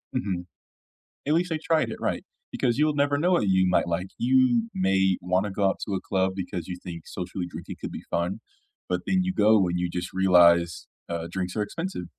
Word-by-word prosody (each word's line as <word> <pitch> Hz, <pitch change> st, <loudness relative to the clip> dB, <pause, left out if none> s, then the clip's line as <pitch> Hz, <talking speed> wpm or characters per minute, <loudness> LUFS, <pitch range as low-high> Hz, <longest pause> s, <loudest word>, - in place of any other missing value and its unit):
Mhm. 95 Hz, -8 st, -2 dB, 0.8 s
At 150 Hz, -, +2 dB
least 175 Hz, +2 st, +1 dB
I 160 Hz, -, +1 dB
tried 160 Hz, -1 st, +1 dB
it, -, -, -5 dB
right. -, -, -2 dB, 0.3 s
Because 120 Hz, -2 st, 0 dB
you'll 150 Hz, 0 st, +2 dB
never 145 Hz, 0 st, +2 dB
know 175 Hz, +5 st, +2 dB
what 140 Hz, -, +2 dB
you 95 Hz, -1 st, +3 dB
might 90 Hz, -, +2 dB
like. 85 Hz, +2 st, -2 dB
You 125 Hz, -2 st, +3 dB
may 95 Hz, 0 st, +2 dB
wanna 95 Hz, +3 st, 0 dB
go 100 Hz, +1 st, 0 dB
out 95 Hz, -, -1 dB
to 100 Hz, -, -2 dB
a 95 Hz, -, -3 dB
club 95 Hz, -1 st, 0 dB
because 90 Hz, -2 st, -5 dB
you 90 Hz, -1 st, -5 dB
think 85 Hz, -2 st, -8 dB
socially 90 Hz, 0 st, -5 dB
drinking -, -, -8 dB
could -, -, -5 dB
be -, -, -7 dB
fun, 90 Hz, +6 st, -1 dB, 0.5 s
but 90 Hz, 0 st, -1 dB
then 185 Hz, -1 st, +2 dB
you 185 Hz, 0 st, -1 dB
go 105 Hz, -, +4 dB
and 90 Hz, 0 st, -1 dB
you 90 Hz, 0 st, -1 dB
just 90 Hz, +1 st, -5 dB
realize, 85 Hz, -3 st, +4 dB, 0.2 s
uh, 85 Hz, -1 st, -3 dB
drinks 90 Hz, 0 st, -3 dB
are 105 Hz, -, +1 dB
expensive, 165 Hz, -, -5 dB
95 Hz, 210 wpm, -26 LUFS, 90-125 Hz, 0.8 s, go